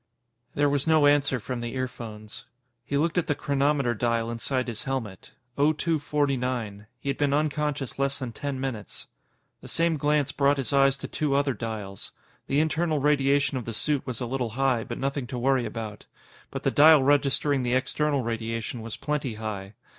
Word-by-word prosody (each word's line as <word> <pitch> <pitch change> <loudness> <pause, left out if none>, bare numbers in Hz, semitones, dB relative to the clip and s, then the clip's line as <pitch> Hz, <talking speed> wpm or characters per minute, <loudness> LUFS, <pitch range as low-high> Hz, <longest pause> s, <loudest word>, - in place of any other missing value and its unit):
There 145 0 +3
was 140 +1 0
no 155 -2 +5
answer 145 -3 +3
from 120 +2 -4
the 120 +1 -4
earphones. 110 -4 -6 0.4
He 140 - -1
looked 165 +4 +2
at 175 - -3
the 145 - +1
chronometer 140 -3 +1
dial 115 0 0
inside 125 +2 -2
his 115 -3 -4
helmet. 115 -8 -4 0.3
Oh 150 +2 +4
two 160 +1 0
forty 145 -1 +1
nine. 115 -5 -3
He 140 - -4
had 140 - -2
been 145 -1 +2
unconscious 150 -3 -1
less 140 0 +1
than 130 -4 -4
ten 140 +2 -4
minutes. 125 -6 -5 0.6
The - - -10
same 165 -1 +1
glance 150 -1 +1
brought 140 0 +2
his 135 0 -2
eyes 135 0 +4
to 135 - -6
two 145 0 -1
other 140 -1 +2
dials. 105 -3 -6 0.3
The 140 - +2
internal 160 0 +1
radiation 140 -1 +2
of 120 - -8
the 115 - -4
suit 145 +2 -1
was 125 -3 -3
a 125 - -2
little 125 -1 -2
high, 125 0 +1
but 120 - -6
nothing 135 -1 -2
to 125 0 -5
worry 130 0 +2
about. 110 -2 -7 0.4
But - - -6
the - - +2
dial 150 -1 +7
registering 140 0 +3
the 125 0 +1
external 140 +1 0
radiation 115 0 -3
was 110 0 -7
plenty 145 -6 -2
high. 105 -2 -5
135 Hz, 190 wpm, -26 LUFS, 120-145 Hz, 0.6 s, dial